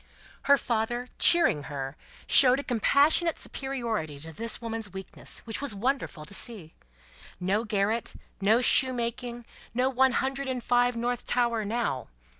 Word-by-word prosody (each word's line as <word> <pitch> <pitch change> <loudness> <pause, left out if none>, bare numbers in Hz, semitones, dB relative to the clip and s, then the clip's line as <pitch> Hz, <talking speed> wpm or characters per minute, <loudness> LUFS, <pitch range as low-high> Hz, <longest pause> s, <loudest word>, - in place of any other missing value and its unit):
Her 280 - +8
father, 240 0 -2
cheering 330 - +5
her, 135 -2 -5 0.3
showed 260 0 +6
a - - -4
compassionate 285 +7 +2
superiority 230 - -4
to 160 +1 -9
this 230 +7 -2
woman's 225 -3 -4
weakness, 190 +1 -7
which 225 +3 -2
was 280 -7 -2
wonderful 225 - -2
to 200 - -12
see. 195 -7 -3 0.7
No 195 +5 0
garret, 210 +2 -1 0.3
no 220 +5 +4
shoemaking, 240 -2 +1 0.3
no 255 +2 +2
One 265 0 +3
Hundred 270 +2 -1
and 255 -2 -3
Five, 245 0 +2
North 240 +1 -2
Tower, 235 -3 +1
now! 215 - -2
235 Hz, 140 wpm, -27 LUFS, 205-255 Hz, 0.7 s, Her